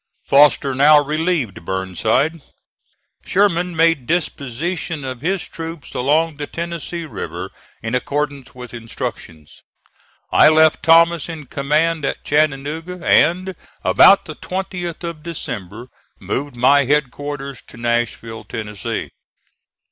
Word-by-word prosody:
Foster 140 -1 +4
now 145 +3 +6
relieved 150 - -1
Burnside. 110 - 0 0.8
Sherman 180 -3 +1
made 165 -6 +2
disposition 160 0 -2
of 130 -2 -6
his 185 +3 -1
troops 165 -2 -8
along 150 +4 +1
the 145 -1 -5
Tennessee 170 0 -5
River 155 - -6 0.3
in 115 +1 -3
accordance 140 +1 -2
with 125 -1 -10
instructions. 100 -9 -7 0.7
I - - +7
left 155 0 +4
Thomas 170 0 +4
in 160 -3 -7
command 150 +4 0
at - - -3
Chattanooga, 155 +4 -1
and, 180 +4 +3 0.3
about 200 - +6
the 155 - -7
20th 180 -2 -5
of 170 -2 -5
December, 120 - -6 0.3
moved 140 -1 -4
my 140 +3 +4
headquarters 145 -1 -2
to - - -14
Nashville, 120 -1 -2
Tennessee. 105 +1 -5
145 Hz, 110 wpm, -19 LUFS, 125-165 Hz, 0.8 s, I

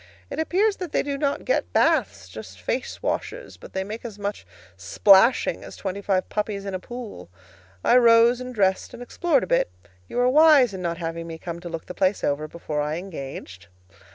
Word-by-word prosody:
It - - -4
appears 390 +6 +1
that 360 -5 -6
they - - +2
do 285 -1 -3
not 280 0 -2
get - - -1
baths, 230 - +1
just 95 0 -10
face 250 - -4
washes, - - -3
but - - -14
they 190 - -1
make 215 +4 -7
as 225 -4 -8
much 205 - -5 0.3
splashing 190 - +4
as - - -10
twenty 195 0 -5
five 190 -2 0
puppies 210 -1 -3
in 195 - -4
a 185 - -2
pool. 220 - -9 0.5
I 245 - +5
rose 235 0 +5
and 250 0 -6
dressed 195 -3 0
and 240 - -8
explored 290 +2 +1
a - - -1
bit. 170 - +1 0.4
You - - -6
were 245 0 +3
wise 285 -4 +6
in 190 - -6
not 170 -1 -2
having 165 0 -5
me 165 -1 -7
come 170 0 -6
to 175 0 -8
look 165 -1 -6
the - - -8
place 190 +2 0
over 145 +2 -1
before 155 -2 -4
I 150 +1 -2
engaged. 135 - -8
195 Hz, 205 wpm, -24 LUFS, 165-250 Hz, 0.5 s, wise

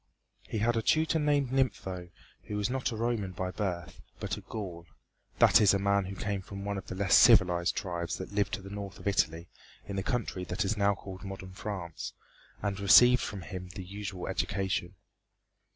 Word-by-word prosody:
He - - -2
had 115 +3 +2
a 115 - +1
tutor 160 +6 +2
named 145 -3 +2
Gnipho 95 -9 -1 0.4
who 105 - -4
was 105 +4 0
not 130 -1 -1
a - - -4
Roman 110 -4 -1
by 90 0 -3
birth, 90 -4 -4 0.2
but - - -2
a - - -9
Gaul 90 -6 -7 0.5
that - - +6
is 100 -1 +6
a - - +3
man 100 0 +2
who 95 +1 -6
came 100 +2 -2
from 100 +1 -8
one 100 -1 -2
of - - -13
the - - -5
less 95 0 +1
civilized 90 -7 +6
tribes 85 -2 -3
that 95 - -7
lived 105 0 0
to 100 - -10
the 95 - -9
north 100 -1 -6
of - - -7
Italy 85 -4 +1 0.4
in 100 - -5
the - - +1
country 105 -3 -2
that 90 +2 -2
is 100 +3 0
now 100 -1 +2
called 95 -1 -9
modern 95 -1 -7
France 95 -5 -5 0.5
and 100 -1 -1
received 125 +5 +7
from 100 - -4
him 90 -2 -7
the 95 - -5
usual 100 -1 -6
education. 95 -1 -2
100 Hz, 200 wpm, -30 LUFS, 95-105 Hz, 0.5 s, received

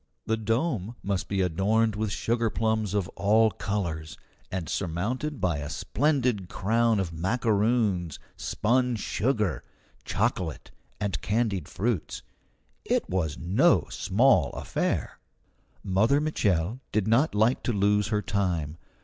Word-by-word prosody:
The 110 - +1
dome 115 - -1
must 100 -2 -1
be 100 -1 0
adorned 100 +5 +1
with 110 0 -1
sugarplums 110 -2 0
of 100 -3 0
all 110 +2 +3
colours, 85 -8 -3 0.3
and 90 -4 -3
surmounted 105 - -2
by 85 -5 0
a 75 0 -5
splendid 125 - 0
crown 115 +2 +1
of 90 -4 -2
macaroons, 100 - +1 0.2
spun 125 +2 +1
sugar, 105 - -1 0.4
chocolate, 95 -8 -2 0.3
and 100 -5 -2
candied 105 -6 0
fruits. 110 -4 -2 0.6
It - - 0
was 80 -5 -1
no 95 - +3
small 110 - +3
affair. - - -2 0.6
Mother 110 +9 +3
Mitchel 105 - 0
did 105 -1 0
not 115 +4 +3
like 110 +4 +3
to - - -1
lose 105 0 +2
her 105 -2 0
time. 85 -7 -1
105 Hz, 120 wpm, -27 LUFS, 90-115 Hz, 0.6 s, all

